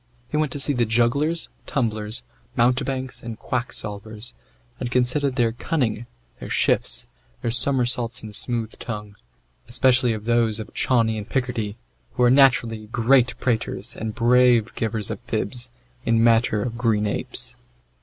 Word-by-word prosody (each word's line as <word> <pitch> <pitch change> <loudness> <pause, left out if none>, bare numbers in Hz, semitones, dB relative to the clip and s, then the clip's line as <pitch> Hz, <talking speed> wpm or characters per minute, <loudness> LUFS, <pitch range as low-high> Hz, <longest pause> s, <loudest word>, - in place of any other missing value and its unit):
He - - -4
went 155 -3 +1
to 145 - -3
see 145 +1 +5
the 120 -3 +1
jugglers, 135 +9 +1 0.2
tumblers, 110 -4 -2 0.3
mountebanks, 130 +2 0
and 115 -2 -7
quacksalvers, 110 -2 -4 0.5
and 125 - -3
considered 125 +2 +1
their 120 -3 +2
cunning, 120 -3 -2 0.3
their - - -7
shifts, - - +1 0.4
their 115 - 0
somersaults 125 -1 +3
and 110 -1 -8
smooth 115 -2 -2
tongue, 105 -3 -6 0.5
especially 125 0 +3
of 110 -1 -6
those 115 -2 +2
of 110 - -8
Chauny 115 -4 +1
in 105 - -6
Picardy, 120 -5 -2 0.4
who 125 - +1
are 120 - +6
naturally 120 -5 +4
great 125 +3 +3
praters, 115 -2 -2
and 110 -1 -5
brave 120 -1 +4
givers 110 -2 -2
of - - -5
fibs, 120 +3 -3 0.3
in 115 -2 +2
matter 115 -2 +3
of 120 -1 -4
green 110 -3 +2
apes. 105 - -4
120 Hz, 145 wpm, -23 LUFS, 110-125 Hz, 0.5 s, are